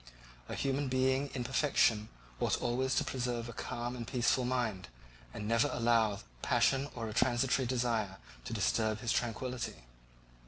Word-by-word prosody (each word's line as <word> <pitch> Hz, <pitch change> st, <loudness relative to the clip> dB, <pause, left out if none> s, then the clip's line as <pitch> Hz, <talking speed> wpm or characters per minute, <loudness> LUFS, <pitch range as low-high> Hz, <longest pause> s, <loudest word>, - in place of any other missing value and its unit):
A -, -, -3 dB
human 140 Hz, +1 st, 0 dB
being 130 Hz, +2 st, +2 dB
in 125 Hz, -, -1 dB
perfection 120 Hz, -4 st, +2 dB, 0.3 s
ought -, -, +1 dB
always 130 Hz, +2 st, 0 dB
to -, -, +3 dB
preserve 120 Hz, -2 st, -2 dB
a 120 Hz, -, -7 dB
calm 120 Hz, +2 st, -4 dB
and 120 Hz, -2 st, -6 dB
peaceful 125 Hz, 0 st, +2 dB
mind 120 Hz, -7 st, -1 dB, 0.4 s
and 105 Hz, -, -5 dB
never 115 Hz, +5 st, +3 dB
to 145 Hz, -, -4 dB
allow 115 Hz, -4 st, +3 dB, 0.2 s
passion 135 Hz, +1 st, +2 dB
or 115 Hz, -2 st, -3 dB
a 110 Hz, -, -5 dB
transitory 125 Hz, +3 st, +2 dB
desire 115 Hz, -6 st, 0 dB, 0.3 s
to -, -, -5 dB
disturb 110 Hz, -1 st, +1 dB
his 120 Hz, -, 0 dB
tranquillity. 120 Hz, -, -2 dB
120 Hz, 155 wpm, -33 LUFS, 115-130 Hz, 0.4 s, to